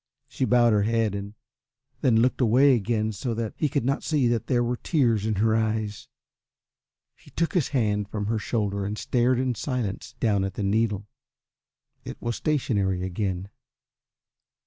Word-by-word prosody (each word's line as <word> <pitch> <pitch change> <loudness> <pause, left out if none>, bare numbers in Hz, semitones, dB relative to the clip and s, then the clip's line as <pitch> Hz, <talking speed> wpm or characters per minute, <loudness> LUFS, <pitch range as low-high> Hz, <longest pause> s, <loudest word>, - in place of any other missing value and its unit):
She 130 - -2
bowed 120 -2 +4
her 105 - +3
head 110 0 +1
and 100 +1 -6 0.7
then 115 -4 +4
looked 130 +2 +1
away 130 +4 +5
again 110 -1 0
so 115 +3 -3
that 115 -1 -3
he 155 - 0
should 140 -3 -1
not 135 +2 0
see 145 -6 +1
that 120 -2 -1
there 120 -2 +2
were 120 +1 -1
tears 115 - +1
in 110 - 0
her 110 +2 +2
eyes. 110 -1 -2 1.1
He - - -19
took 165 0 -1
his 175 -7 +2
hand 105 -6 0
from 105 -1 -3
her 110 +1 0
shoulder 100 -3 -1
and 105 +2 -3
stared 125 +2 +1
in 130 0 0
silence 120 -2 -4
down 105 -5 +2
at 95 -1 -4
the 105 - -3
needle. 105 0 0 1.0
It - - -8
was 120 -1 -3
stationary 100 -11 0
again. 95 0 -3
110 Hz, 170 wpm, -25 LUFS, 105-125 Hz, 1.1 s, away